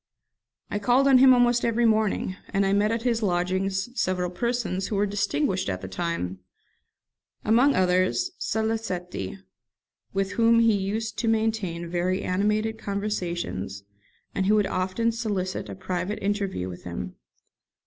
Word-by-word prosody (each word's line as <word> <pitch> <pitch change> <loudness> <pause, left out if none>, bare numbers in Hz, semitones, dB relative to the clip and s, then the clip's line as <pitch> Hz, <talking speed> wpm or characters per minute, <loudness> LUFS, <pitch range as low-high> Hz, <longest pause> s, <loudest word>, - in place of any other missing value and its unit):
I 205 - -1
called 250 +6 +3
on 265 -2 +7
him 265 0 +8
almost 245 -1 +4
every 235 0 +2
morning, 215 -4 +1
and 195 -1 +1
I 195 - +2
met 205 +2 +2
at 230 0 -1
his 235 -2 +1
lodgings 190 +1 0
several 180 -6 -1
persons 220 -3 -1
who 215 - -3
were 200 +1 +2
distinguished 205 - 0
at 90 -1 -3
the 95 - -6
time; 95 - -3 1.1
among 245 +6 +4
others 185 - +2
Salicetti, 185 - -2 0.7
with 195 0 -1
whom 230 +2 +4
he 230 -1 +5
used 210 +3 -2
to 235 - -1
maintain 220 -6 0
very 180 +2 -1
animated 210 +4 0
conversations, 175 - -3 0.5
and 190 - 0
who 210 - +5
would 210 -1 +3
often 190 +5 0
solicit 205 -5 -3
a - - -6
private 185 +2 -3
interview 195 - -2
with 90 -1 -8
him. 90 +1 -5
200 Hz, 145 wpm, -26 LUFS, 180-225 Hz, 1.1 s, him